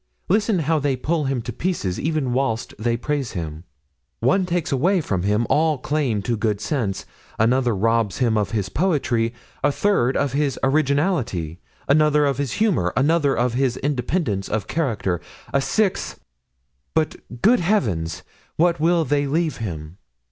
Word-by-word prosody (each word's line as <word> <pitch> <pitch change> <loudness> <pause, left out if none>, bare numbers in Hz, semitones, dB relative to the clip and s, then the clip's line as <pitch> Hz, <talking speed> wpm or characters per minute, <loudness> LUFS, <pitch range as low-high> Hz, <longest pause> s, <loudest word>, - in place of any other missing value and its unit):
Listen 210 +1 +2
how 160 -1 +1
they 140 -2 0
pull 150 +4 -1
him 135 -3 -1
to 120 - -5
pieces 115 - -2
even 155 -5 -1
whilst 120 -3 -1
they 115 +1 0
praise 140 0 -2
him; 80 -2 -5 0.5
one 180 - +2
takes 175 -2 -1
away 175 +9 +2
from 95 - -1
him 105 +4 +1
all 155 -1 +2
claim 130 -6 -1
to 120 +1 0
good 105 -2 -1
sense, 105 -7 -2 0.3
another 120 +1 +2
robs 115 0 +1
him 120 -4 +2
of 105 -1 +1
his 105 -4 -1
poetry, 130 - 0 0.3
a 145 - +4
third 140 -8 +1
of 140 -2 0
his 140 -2 0
originality, 135 - +1 0.3
another 150 +1 +4
of 140 -1 0
his 135 -3 -1
humor, 190 - +1
another 145 +1 +2
of 120 0 +1
his 130 -1 +1
independence 130 - -1
of 105 -1 -1
character, 110 - -1 0.3
a 140 - +3
sixth—but, 65 - -3 0.3
good 240 +4 +5
heavens! 105 - 0 0.3
what 170 0 +2
will 165 +1 +3
they 145 +1 +1
leave 160 +2 0
him? 85 -5 -6
135 Hz, 155 wpm, -22 LUFS, 105-155 Hz, 0.5 s, good